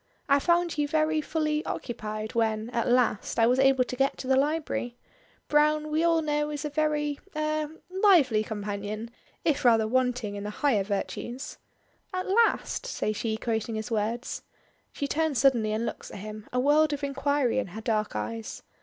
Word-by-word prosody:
I 280 0 +5
found 345 +1 +1
you 295 - +2
very 310 +1 +1
fully 305 -1 -1
occupied 215 -2 -5
when 220 0 0
at 235 -2 0
last 245 -4 +1
I 225 - +5
was 250 +3 +3
able 270 -1 +5
to 250 - -6
get 270 +1 +1
to 260 - -6
the 265 - +4
library. 280 -4 -1 0.5
Browne 300 +1 +2
we 315 +2 +2
all 330 -1 +3
know 295 0 0
is 295 0 -4
a 300 - -3
very 295 -1 0 0.2
er 305 0 -1 0.2
lively 345 - +4
companion 210 +1 -5 0.3
if 295 -3 +1
rather 225 -3 +5
wanting 250 -3 0
in 200 0 -5
the 210 - -4
higher 215 -2 +1
virtues." 225 +6 -4 0.6
"'At 370 - -2
last,'" 460 +4 +2
says 215 - -2
she 220 0 -2
quoting 225 -1 -2
his 220 +2 -4
words. 225 +3 -2 0.5
She 280 - -3
turns 315 -2 0
suddenly 235 -4 +3
and 220 +2 -1
looks - - -5
at - - -9
him, 215 +1 -8
a 250 - 0
world 295 +3 +4
of 290 0 -4
inquiry 275 -2 +1
in 260 - -2
her 210 +5 -8
dark 215 - -1
eyes. 110 +1 -5
260 Hz, 180 wpm, -27 LUFS, 220-300 Hz, 0.6 s, I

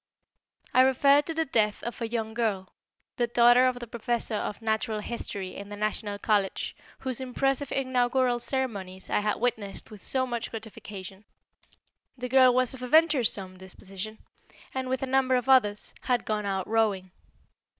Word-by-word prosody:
I 255 - +6
refer 275 +2 +5
to 325 +2 -5
the 320 0 +1
death 215 -6 +1
of 235 +1 -6
a 230 - -1
young 225 -1 -3
girl, 210 -5 -2 0.4
the 240 - +1
daughter 240 +2 +6
of 255 -1 0
the 240 - -6
Professor 235 0 -2
of 210 -1 -3
Natural 220 0 -1
History 205 -4 -4
in 200 0 -8
the 205 - -6
National 210 0 -2
College, 205 -2 0 0.3
whose 260 -1 -2
impressive 270 +2 -1
inaugural 255 -1 +1
ceremonies 205 -8 -3
I - - +3
had 210 0 0
witnessed 220 -3 -3
with 210 -2 -11
so 260 -1 0
much 240 -2 -3
gratification. 205 -3 -8 0.9
The 250 0 -4
girl 260 0 +6
was 255 0 +2
of 260 - -9
a 250 - -4
venturesome 245 - +3
disposition, 195 +3 -8 0.6
and, 260 -1 -3
with 260 +1 -1
a - - +1
number 260 0 +2
of 250 0 -1
others, 210 -6 +3
had 245 -1 0
gone 210 -1 -1
out 190 -2 -2
rowing. 210 -4 +1
235 Hz, 165 wpm, -27 LUFS, 210-255 Hz, 0.9 s, I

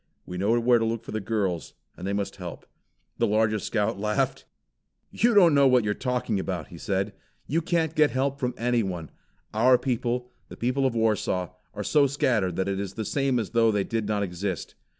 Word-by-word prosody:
We 90 0 -6
know 110 +5 +2
where 120 0 +4
to - - 0
look 115 0 -2
for - - -8
the 110 - -2
girls, 95 - -2 0.2
and 90 - -6
they 100 - -1
must 100 -1 -3
help." 90 -3 -8 0.5
The - - +3
largest 110 -1 +1
Scout 110 -1 0
laughed. 105 0 -1 0.7
"You 235 0 +2
don't 175 -6 +7
know 140 -1 +6
what 125 -2 +4
you 105 - 0
are - - +1
talking 125 -4 -1
about," 90 -4 -4
he 85 - -10
said. 100 +2 -1 0.3
"You 165 +4 0
can't 160 -2 0
get 155 -2 +4
help 135 +1 -1
from 125 -2 -1
anyone. 105 -9 -1 0.4
Our 125 +4 +5
people, 125 0 -2 0.2
the - - -10
people 130 +3 +1
of 125 - -3
Warsaw, 105 -5 0 0.2
are 105 - -3
so 145 +5 +4
scattered, 115 -10 +1
that 95 - -1
it 100 0 -1
is 100 -1 -5
the 110 - -3
same 135 0 +1
as 110 -5 -2
though 115 -1 +4
they 105 -2 +1
did 115 -1 -2
not 105 -1 0
exist. 95 -1 -4
110 Hz, 210 wpm, -26 LUFS, 100-125 Hz, 0.7 s, don't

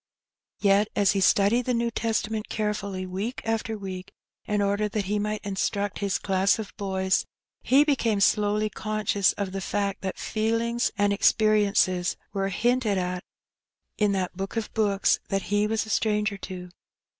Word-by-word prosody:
Yet 200 +1 +4
as 200 -2 +4
he 195 - 0
studied 205 +5 +3
the 250 - +2
New 235 0 0
Testament 220 -1 -2
carefully 200 -3 -2
week 195 +7 -4
by 225 0 -1
week, 190 -2 -7 0.3
in 210 -1 0
order 205 +1 +1
that 205 -1 -2
he 205 +2 0
might 210 0 -3
instruct 200 0 -2
his 200 -2 0
class 195 +1 +2
of 220 -3 -7
boys, 190 -1 0 0.3
he 275 +3 +5
became 240 -8 +1
slowly 210 +1 +2
conscious 215 -2 0
of 200 -2 -4
the 195 0 -4
fact 200 +1 -2
that 190 -1 -4
feelings 230 +2 0
and 205 -1 +2
experiences 200 -4 +3 0.2
were 195 -1 -1
hinted 235 0 +1
at 180 0 -2 0.8
in 210 -1 +3
that 185 -2 -2
Book 195 +4 -5
of 225 - -3
books 205 -3 +2
that 195 -1 0
he 205 +1 +3
was 220 0 0
a 220 - -6
stranger 210 -1 +1
to. 180 -1 -7
205 Hz, 160 wpm, -26 LUFS, 195-220 Hz, 0.8 s, he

